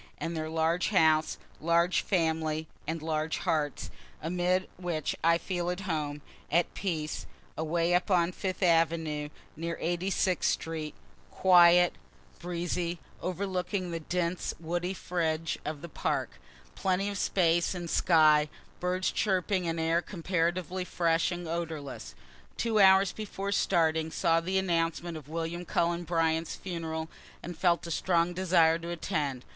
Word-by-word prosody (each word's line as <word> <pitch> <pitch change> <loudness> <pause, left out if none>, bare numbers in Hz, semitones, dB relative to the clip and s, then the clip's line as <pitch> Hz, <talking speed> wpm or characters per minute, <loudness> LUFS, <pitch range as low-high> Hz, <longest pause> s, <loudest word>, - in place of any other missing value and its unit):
and 165 0 -4
their 155 0 -3
large 165 +2 +1
house, 160 -5 +3 0.2
large 170 +2 +2
family 160 -3 0 0.2
(and 160 0 -3
large 155 0 -1
hearts,) 155 -6 -1 0.3
amid 180 +3 0
which 175 -4 -2
I 165 +1 +5
feel 175 0 -3
at 180 +2 -3
home, 150 -6 -3 0.3
at 170 +2 +2
peace 155 -6 -3 0.3
away 165 +2 0
up 180 +4 +2
on 175 -2 +3
Fifth 185 +1 -3
avenue, 165 -3 +2 0.3
near 170 +2 -4
Eighty 175 +3 -1
sixth 185 -2 +1
street, 160 -2 -5 0.3
quiet, 175 - +6 0.5
breezy, 175 0 -2 0.2
overlooking 185 0 -2
the 165 - -3
dense 175 +2 -2
woody 175 +3 -2
fringe 165 -3 -2
of 150 0 -5
the - - -5
park 155 - -2 0.4
plenty 190 +1 0
of 200 -1 -3
space 170 -1 +2
and 175 -1 -5
sky, 155 -3 +4 0.3
birds 180 +1 0
chirping, 190 -2 0
and 165 0 -1
air 165 +1 +2
comparatively 180 0 -1
fresh 165 -1 +1
and 175 -1 -5
odorless. 160 - -5 0.4
Two 225 -2 +1
hours 190 -1 +6
before 200 -2 -5
starting, 160 -5 +2
saw 165 0 +2
the 185 +3 -1
announcement 170 -2 0
of 150 -2 -9
William 165 +2 -3
Cullen 170 0 0
Bryant's 165 -1 0
funeral, 160 -3 -4 0.4
and 175 - -6
felt 170 +1 +2
a 170 - -5
strong 170 +1 +1
desire 170 -3 +3
to 170 +1 -7
attend. 145 -6 -2
170 Hz, 140 wpm, -29 LUFS, 160-180 Hz, 0.5 s, quiet